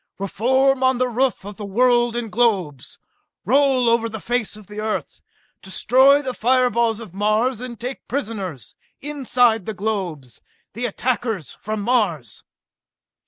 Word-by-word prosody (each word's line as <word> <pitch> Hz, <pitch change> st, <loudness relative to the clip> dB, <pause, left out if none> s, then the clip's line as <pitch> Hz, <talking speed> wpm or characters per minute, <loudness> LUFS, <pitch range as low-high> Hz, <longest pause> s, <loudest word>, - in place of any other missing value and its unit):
Reform 260 Hz, +7 st, +1 dB
on 260 Hz, -1 st, +3 dB
the 255 Hz, +1 st, +1 dB
roof 250 Hz, -3 st, -1 dB
of 205 Hz, 0 st, -8 dB
the 210 Hz, -, -7 dB
world 240 Hz, +2 st, +2 dB
in 235 Hz, -3 st, -4 dB
globes! 190 Hz, -, 0 dB, 0.5 s
Roll 265 Hz, +1 st, +3 dB
over 230 Hz, 0 st, +2 dB
the 220 Hz, 0 st, -6 dB
face 240 Hz, -1 st, -2 dB
of 215 Hz, -1 st, -13 dB
the 210 Hz, +2 st, -9 dB
Earth, 215 Hz, 0 st, -4 dB, 0.4 s
destroy 265 Hz, +8 st, +4 dB
the 260 Hz, -2 st, -3 dB
fire 250 Hz, +1 st, +2 dB
balls 230 Hz, -1 st, +1 dB
of 215 Hz, -7 st, -10 dB
Mars 215 Hz, +5 st, +1 dB
and 245 Hz, -2 st, -7 dB
take 250 Hz, +3 st, -6 dB
prisoners, 200 Hz, -, -4 dB, 0.3 s
inside 250 Hz, -7 st, +1 dB
the 220 Hz, -, -4 dB
globes, 185 Hz, -, -4 dB, 0.3 s
the 245 Hz, +2 st, -2 dB
attackers 225 Hz, -, -2 dB
from 215 Hz, 0 st, -5 dB
Mars!" 195 Hz, -, -1 dB
230 Hz, 145 wpm, -21 LUFS, 205-255 Hz, 0.5 s, destroy